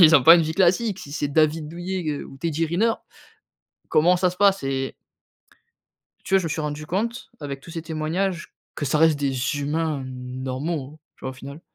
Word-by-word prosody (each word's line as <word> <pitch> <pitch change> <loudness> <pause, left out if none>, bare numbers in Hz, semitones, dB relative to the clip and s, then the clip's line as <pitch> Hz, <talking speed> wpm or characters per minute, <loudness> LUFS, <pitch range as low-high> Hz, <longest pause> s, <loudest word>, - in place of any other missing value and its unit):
ils 160 -2 +9
ont 135 - +3
pas 165 +4 +10
une 170 - +4
vie 160 +1 -2
classique, 195 +3 +2
si 140 - -9
c'est 145 -1 -1
David 155 +1 +2
Douillet, 175 +2 -4
heu, 145 - -4
ou 135 - -12
Teddy 165 0 -1
Riner, 210 +8 +2 1.0
comment 175 +4 +4
ça 180 0 +3
se 180 - -13
passe? 200 -6 +4
Et 135 0 -2 1.3
tu 195 - 0
vois, - - +7
je - - -5
me - - -1
suis 155 +1 -2
rendu 150 0 -4
compte, 230 +8 -2
avec 140 -2 -5
tous 165 - -12
ces 165 -1 -5
témoignages, 170 +3 -2 0.2
que 145 - -3
ça 150 - +1
reste 160 -2 +4
des 140 -2 0 0.3
humains 150 -1 -1
normaux, 130 +4 -5 0.2
tu - - -27
vois? 130 - -2
Au - - -8
final. 140 +4 -10
155 Hz, 205 wpm, -24 LUFS, 140-175 Hz, 1.3 s, pas